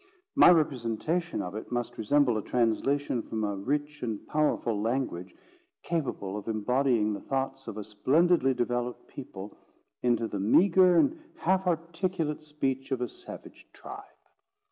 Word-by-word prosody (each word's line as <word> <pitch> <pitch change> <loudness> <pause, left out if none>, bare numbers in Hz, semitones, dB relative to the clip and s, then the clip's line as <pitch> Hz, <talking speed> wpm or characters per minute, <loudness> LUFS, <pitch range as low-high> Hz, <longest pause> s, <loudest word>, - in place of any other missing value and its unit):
My 280 - +8
representation 155 +2 +1
of 90 - -6
it 110 +3 -7
must 120 -1 -3
resemble 125 +2 +3
a 110 - -1
translation 125 +3 0
from 110 0 -4
a 100 -1 -1
rich 145 +8 -2
and 110 -4 -4
powerful 120 -8 0
language, 115 -6 -2 0.5
capable 125 - -2
of 105 - -8
embodying 115 0 +1
the - - -4
thoughts 135 0 -3
of 105 - -6
a 105 - -4
splendidly 135 - +2
developed 120 0 -2
people, 105 -7 -9 0.5
into 120 -2 +1
the 100 - -4
meagre 180 - +5
and 310 - +2
half 190 - +1
articulate 165 -2 -1
speech 135 -3 -3
of 130 - 0
a 125 - -1
savage - - -12
tribe. - - -9
130 Hz, 145 wpm, -29 LUFS, 110-155 Hz, 0.5 s, My